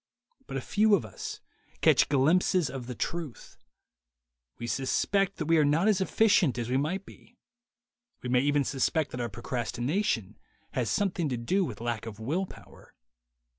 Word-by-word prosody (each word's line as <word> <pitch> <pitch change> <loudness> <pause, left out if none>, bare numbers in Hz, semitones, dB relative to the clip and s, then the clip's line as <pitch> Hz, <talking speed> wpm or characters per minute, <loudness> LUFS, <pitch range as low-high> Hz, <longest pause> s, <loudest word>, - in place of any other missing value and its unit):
But - - -4
a - - -2
few 210 0 +3
of 165 - -2
us 100 - -7 0.4
catch - - +5
glimpses 160 +4 +3
of 130 -3 -6
the 125 - -5
truth; 165 -4 -5 1.0
we 120 - -6
suspect 180 - 0
that - - -3
we 165 +1 +4
are - - +5
not 155 +7 +3
as 205 -3 +3
efficient 190 - +3
as 120 0 -3
we - - +2
might 180 +8 -1
be; 240 - -17 0.9
we 125 - -3
may 125 0 +4
even 145 +2 +2
suspect 140 +3 0
that 125 - -4
our 120 - -2
procrastination 120 - -2 0.3
has 120 -3 -1
something 185 -6 0
to 125 - -2
do 185 +12 +1
with 115 - -5
lack 115 -1 -3
of 110 -1 -8
will 160 +12 -1
power. - - -16
145 Hz, 170 wpm, -29 LUFS, 120-185 Hz, 1.0 s, catch